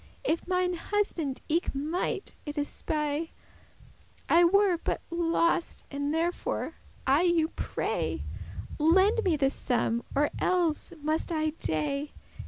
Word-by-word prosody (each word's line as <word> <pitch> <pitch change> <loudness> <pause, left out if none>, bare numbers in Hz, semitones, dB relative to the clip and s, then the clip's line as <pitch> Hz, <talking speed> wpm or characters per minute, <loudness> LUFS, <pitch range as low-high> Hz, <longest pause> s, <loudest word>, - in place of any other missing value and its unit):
And - - +4
if 335 - -5
mine 365 0 +1
husband 345 -7 -1
eke 330 -2 0
might 325 +7 -2
it 295 +1 -5
espy, 300 +1 -2 0.9
I 340 +1 +6
were 380 0 +4
but - - -1
lost; 335 0 +1
and 285 +1 -1
therefore 335 +2 -1 0.3
I 275 +4 +4
you 340 -3 +3
pray, - - -2 0.6
Lend 380 +8 +4
me 345 -5 +2
this 275 -1 +2
sum, 235 -2 0
or 290 +1 +3
elles 350 -4 +1
must 310 +3 0
I 310 -1 +1
dey. 280 - -2
325 Hz, 125 wpm, -29 LUFS, 290-350 Hz, 0.9 s, I